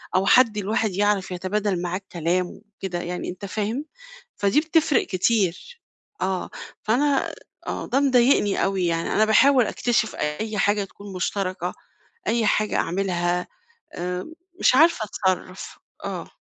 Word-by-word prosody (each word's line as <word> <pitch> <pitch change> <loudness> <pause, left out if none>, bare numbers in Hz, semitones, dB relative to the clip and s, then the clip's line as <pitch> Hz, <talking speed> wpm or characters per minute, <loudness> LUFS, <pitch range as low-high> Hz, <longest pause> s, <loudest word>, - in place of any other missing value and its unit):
أو 190 - +3
حد 225 -1 +5
الواحد 215 +1 0
يعرف 200 -1 +1
يتبادل 185 0 -1
معاه 180 +1 -2
الكلام 180 -2 -1
وكده 195 -3 -7
يعني، 180 +1 -4
أنت 185 +3 -7
فاهم؟ 220 +8 -3 0.5
فدي 200 +9 +3
بتفرق 315 -3 +2
كتير، 200 - 0 0.4
آه. 190 -1 -2 0.3
فأنا 275 +5 +1 0.3
آه، - - -3
ده 265 +2 +1
مضايقني 250 -6 +3
أوي 190 -2 0
يعني، 165 0 -1
أنا 215 - +4
باحاول 250 +3 +5
أكتشف 235 -1 0
أي 210 +9 -3
حاجة 205 0 +2
تكون 200 0 -12
مشتركة، 185 -1 -2 0.5
أي 230 0 +2
حاجة 210 0 +1
أعملها، 180 -1 0 0.5
آآ، 180 +1 -3 0.3
مش - - +4
عارفة 305 -6 +4
أتصرف، 190 -2 -3 0.3
آه. - - -5
200 Hz, 130 wpm, -24 LUFS, 185-225 Hz, 0.5 s, حد